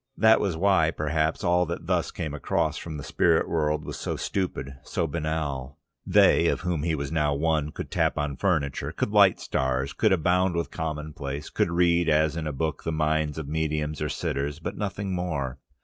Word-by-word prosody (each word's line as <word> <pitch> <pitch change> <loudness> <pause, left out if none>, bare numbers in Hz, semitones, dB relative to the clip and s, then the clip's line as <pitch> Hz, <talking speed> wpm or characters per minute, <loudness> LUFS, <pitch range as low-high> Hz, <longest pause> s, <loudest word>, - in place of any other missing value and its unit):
That 110 0 +6
was 95 -5 -1
why, 95 -3 +3
perhaps, 80 0 -1
all 90 0 +3
that 85 - -5
thus - - 0
came 75 -2 -5
across 75 +1 0
from 80 -3 -6
the 70 - -7
spirit 80 -2 +2
world, 75 -2 0
was - - -6
so - - -2
stupid, 70 -8 -3
so 85 - -2
banal. 75 -4 -3 0.3
They, - - +5
of - - 0
whom 90 -4 -1
he 80 +1 0
now 75 +1 0
was - - -4
one, 75 -1 +1
could - - -7
tap - - +1
on 75 -1 -1
furniture, 75 -4 0
could - - -2
light - - +5
stars, 65 +1 -1
could 110 - +2
abound 90 +1 +2
with 85 -1 -2
commonplace, 75 -3 -5
could - - +1
read 85 0 +3
as 80 0 +3
in 80 -2 -3
a - - -1
book 75 +1 -3
the 80 - -2
mind 80 -1 0
of 80 -3 -5
medium 75 0 -1
or 75 - -1
sitters, 70 +2 -2
but 80 - -5
nothing 100 -1 -3
more. 70 -7 -3
80 Hz, 195 wpm, -26 LUFS, 75-85 Hz, 0.3 s, That